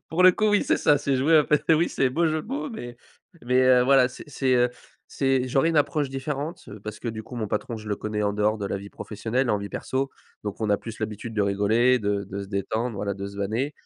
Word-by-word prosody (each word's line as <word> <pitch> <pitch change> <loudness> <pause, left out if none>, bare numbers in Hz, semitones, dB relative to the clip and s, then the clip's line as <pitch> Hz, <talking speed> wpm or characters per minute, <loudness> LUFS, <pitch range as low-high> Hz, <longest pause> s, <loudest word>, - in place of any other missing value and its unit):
Pour 170 +3 +1
le 185 - +9
coup, 215 +2 +1
oui, 205 -1 +3
c'est - - +2
ça, 145 -1 +3
c'est 140 -1 0
jouer 155 +5 +4
à 150 - +5
peu 150 - +3 0.2
oui, 165 +2 +2
c'est 130 -2 +1
beau 165 +6 +1
jeu 155 0 0
de - - -14
mots, 290 +3 -3
mais 120 - -8 0.5
mais 125 +1 +2
heu, 130 -1 +6
voilà, 130 -1 +5
c'est, 125 - -11 0.3
heu, 120 0 +4 0.4
c'est 135 -2 0
j'aurais 135 +5 +2
une 165 - 0
approche 145 -1 +2
différente, 140 +4 -4
heu, 105 0 -10
parce 105 +1 -7
que 120 - -8
du 110 -1 -5
coup, 125 - -10
mon 110 -2 -2
patron, 105 +3 -3
je 110 -1 -9
le 105 - 0
connais 105 +1 -3
en 100 - +1
dehors 105 +1 +1
de 100 - -3
la - - -2
vie 100 +1 -9
professionnelle 115 +5 -2
et - - +1
en 105 - +2
vie 100 0 -6
perso, 135 +5 -2 0.3
donc 105 +1 -5
on 110 - 0
a 100 - +4
plus 115 +1 -9
l'habitude 110 +1 -5
de 105 - +2
rigoler, 110 +6 +3
de 100 -1 -1
de 100 +1 -6
se 100 - -9
détendre, 110 +4 -2
voilà, 100 0 -2
de 100 0 -5
se 100 - -11
vanner. 110 +8 -1
120 Hz, 270 wpm, -25 LUFS, 105-135 Hz, 0.5 s, le